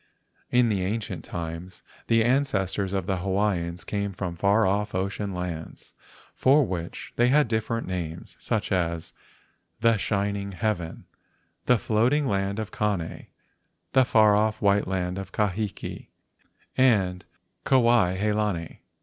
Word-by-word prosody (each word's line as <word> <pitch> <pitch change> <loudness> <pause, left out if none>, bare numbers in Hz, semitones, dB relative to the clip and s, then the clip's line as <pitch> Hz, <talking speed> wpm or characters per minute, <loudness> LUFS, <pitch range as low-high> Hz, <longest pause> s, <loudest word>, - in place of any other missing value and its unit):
In 125 -1 +4
the 100 -4 0
ancient 100 -3 -3
times, 85 +2 -6 0.2
the 115 0 +4
ancestors 100 -7 +1
of 95 -2 -1
the 95 0 -1
Hawaiians 90 -2 -1
came 100 -1 -3
from 90 -2 -4
far 100 +5 +3
off 105 +2 0
ocean 100 +2 -2
lands, 90 -3 -6 0.4
for 140 +2 +4
which 85 -4 -5
they 120 - +4
had 145 +2 +4
different 115 +1 -1
names, 85 -2 -5
such 105 -1 -2
as 85 -3 -1 0.7
The 115 -1 +4
Shining 100 -1 -1
Heaven, 90 -5 -3 0.6
The 125 - +5
Floating 120 +8 +2
Land 100 -3 0
of 110 -2 -4
Kane, 100 -6 -2 0.6
The 130 - +5
Far 110 -4 +5
off 110 +1 +1
White 100 0 +2
Land 90 0 -2
of 95 - -7
Kahiki, 105 0 -3 0.7
and 100 -8 +3 0.4
Kuai 120 -8 +4
he 105 +2 +1
lani. 105 -6 -2
100 Hz, 130 wpm, -26 LUFS, 90-110 Hz, 0.7 s, The